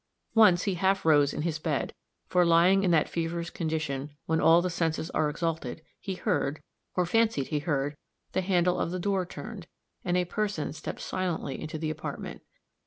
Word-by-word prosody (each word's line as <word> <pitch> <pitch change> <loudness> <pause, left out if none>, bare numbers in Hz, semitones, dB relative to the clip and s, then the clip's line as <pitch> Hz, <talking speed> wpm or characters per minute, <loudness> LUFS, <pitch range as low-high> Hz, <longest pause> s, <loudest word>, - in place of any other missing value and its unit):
Once 190 -6 +6
he 200 - 0
half 190 +1 +1
rose 145 -3 +5
in 150 - -3
his 160 -2 -1
bed; 155 -3 -1 0.3
for, 180 -1 +3
lying 175 +3 +5
in 190 - +2
that 165 -3 +4
feverish 170 0 -3
condition 155 -4 -2 0.2
when 160 0 +1
all 165 +1 +7
the 180 - 0
senses 165 -1 -1
are 150 - +1
exalted, 160 -2 -3 0.2
he 190 - -4
heard, 170 -7 0 0.4
or 180 - +2
fancied 220 - +2
he 150 - 0
heard, 145 -1 -1 0.4
the - - 0
handle 180 -1 +2
of - - 0
the 180 - -3
door 190 0 0
turned, - - -8 0.4
and 180 0 +1
a 180 - +2
person 200 -5 -2
step - - -6
silently 175 -7 -3
into 155 0 -5
the 155 0 -2
apartment. 155 0 -6
170 Hz, 180 wpm, -28 LUFS, 155-185 Hz, 0.4 s, all